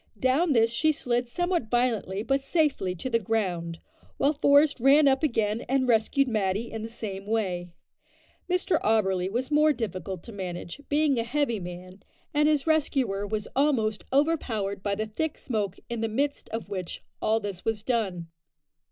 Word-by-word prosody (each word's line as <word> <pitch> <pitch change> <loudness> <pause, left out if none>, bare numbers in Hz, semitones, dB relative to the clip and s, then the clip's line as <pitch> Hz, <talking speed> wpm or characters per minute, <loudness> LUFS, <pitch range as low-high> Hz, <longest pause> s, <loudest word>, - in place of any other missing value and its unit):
Down 280 +5 +3
this 230 -1 +4
she 310 +7 +2
slid 245 -4 -1
somewhat 350 -4 -1
violently 225 -5 0
but 270 +3 +1
safely 275 - 0
to 180 - -5
the 230 -2 +2
ground, 180 -6 -2 0.4
while 285 +2 +3
Forest 285 0 +4
ran 280 +4 +6
up 265 -1 +3
again 225 -7 0
and 265 -1 +2
rescued 240 +4 +3
Matty 215 -1 -1
in 225 - -5
the 225 - -5
same 200 -4 -6
way. 185 -5 -1 0.8
Mr 360 -2 +1
Auberly 190 -4 +2
was 255 +6 -2
more 305 +1 +5
difficult 190 - -4
to - - -10
manage, 185 +3 -6
being 290 -3 +2
a - - +1
heavy 235 -2 0
man, 180 +1 -9 0.3
and 300 0 +4
his 300 -3 +2
rescuer 265 -10 +1
was 215 0 -3
almost 245 -7 +1
overpowered 255 -10 0
by 200 0 -1
the 215 +2 -2
thick 290 +9 -3
smoke 210 -7 -2
in 235 -2 -4
the 225 - 0
midst 280 +6 -2
of 225 0 -4
which 185 -4 -5 0.2
all 220 +1 +2
this 200 -4 -6
was 220 -2 -1
done. 205 -8 -1
225 Hz, 170 wpm, -27 LUFS, 200-275 Hz, 0.8 s, ran